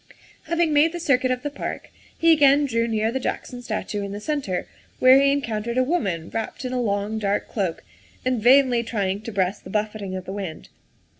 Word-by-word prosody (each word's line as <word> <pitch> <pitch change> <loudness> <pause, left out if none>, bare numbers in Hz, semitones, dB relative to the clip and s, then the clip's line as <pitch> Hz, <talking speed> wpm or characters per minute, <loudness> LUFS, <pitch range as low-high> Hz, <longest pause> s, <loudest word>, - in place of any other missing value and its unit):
Having 335 -2 +1
made 305 +3 +4
the 345 - -4
circuit 260 -5 +2
of 255 0 -1
the 290 - -3
park, 280 - -6 0.3
he 330 0 +4
again 290 -2 +5
drew 230 -3 0
near 220 0 0
the 265 - -2
Jackson 250 -1 -4
statue 215 -3 -3
in 200 0 -5
the 205 - -5
centre, 260 -8 -2 0.3
where 260 +1 +7
he 275 0 +4
encoun 230 -7 -1
tered 235 +2 -3
a 255 - +4
woman 195 - -1
wrapped 225 +4 -4
in 255 - -3
a 250 - 0
long, 205 0 -1
dark 205 -1 -1
cloak 190 -6 -3 0.4
and 255 -3 0
vainly 250 0 +5
trying 200 -4 -2
to 230 - -7
breast 195 0 -1
the - - -10
buffeting 210 -2 -3
of 185 -1 -6
the 190 - -6
wind. 190 -6 -6
230 Hz, 210 wpm, -23 LUFS, 205-270 Hz, 0.4 s, where